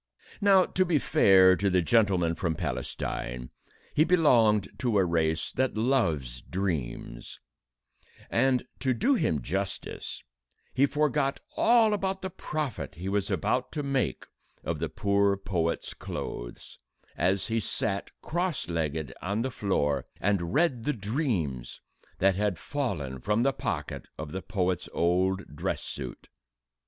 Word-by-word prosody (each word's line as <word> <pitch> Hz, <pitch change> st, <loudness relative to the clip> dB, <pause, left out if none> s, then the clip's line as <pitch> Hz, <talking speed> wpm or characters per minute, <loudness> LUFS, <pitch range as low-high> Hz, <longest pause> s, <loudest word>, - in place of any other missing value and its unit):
Now, 195 Hz, -2 st, +6 dB
to 185 Hz, -, +1 dB
be 170 Hz, -4 st, +2 dB
fair 95 Hz, -7 st, +6 dB
to 100 Hz, +2 st, +1 dB
the 90 Hz, -1 st, +3 dB
gentleman 95 Hz, -5 st, +3 dB
from 85 Hz, -2 st, -1 dB
Palestine, -, -, -4 dB, 0.4 s
he 155 Hz, -, +5 dB
belonged 120 Hz, -, +4 dB
to 120 Hz, -5 st, +1 dB
a 95 Hz, -, +4 dB
race 80 Hz, -2 st, 0 dB
that 130 Hz, -4 st, 0 dB
loves 80 Hz, -, +1 dB
dreams, 75 Hz, -10 st, -4 dB, 0.9 s
and, 130 Hz, +1 st, +2 dB
to 130 Hz, -2 st, +1 dB
do 245 Hz, -, +3 dB
him 80 Hz, -, +1 dB
justice, 95 Hz, +7 st, -4 dB, 0.5 s
he 135 Hz, +2 st, +4 dB
forgot 145 Hz, -1 st, +1 dB, 0.2 s
all 230 Hz, -2 st, +5 dB
about 190 Hz, -1 st, -2 dB
the 190 Hz, -, -3 dB
profit 150 Hz, -, -4 dB
he 90 Hz, +4 st, -6 dB
was 100 Hz, 0 st, 0 dB
to 130 Hz, +7 st, -1 dB
make 135 Hz, -2 st, -1 dB, 0.4 s
of -, -, -2 dB
the -, -, -2 dB
poor 100 Hz, 0 st, +2 dB
poet's 85 Hz, -4 st, -2 dB
clothes, -, -, -7 dB, 0.4 s
as 95 Hz, +3 st, +1 dB
he 115 Hz, 0 st, 0 dB
sat, 100 Hz, -1 st, -1 dB
cross 175 Hz, -2 st, -1 dB
legged, 80 Hz, -4 st, -2 dB
on 100 Hz, +5 st, -1 dB
the 130 Hz, -, -2 dB
floor, 75 Hz, -, 0 dB
and 95 Hz, -4 st, 0 dB
read 145 Hz, -7 st, +2 dB
the 150 Hz, -, +1 dB
dreams 100 Hz, -, -2 dB, 0.4 s
that 95 Hz, +1 st, +4 dB
had 100 Hz, -1 st, 0 dB
fallen 85 Hz, -, -3 dB
from 105 Hz, -, +1 dB
the 135 Hz, +1 st, +2 dB
pocket -, -, -4 dB
of 75 Hz, -1 st, -6 dB
the 95 Hz, -, -4 dB
poet's 90 Hz, -3 st, -1 dB
old 90 Hz, 0 st, +1 dB
dress -, -, -2 dB
suit. -, -, -7 dB
100 Hz, 135 wpm, -28 LUFS, 85-135 Hz, 0.9 s, Now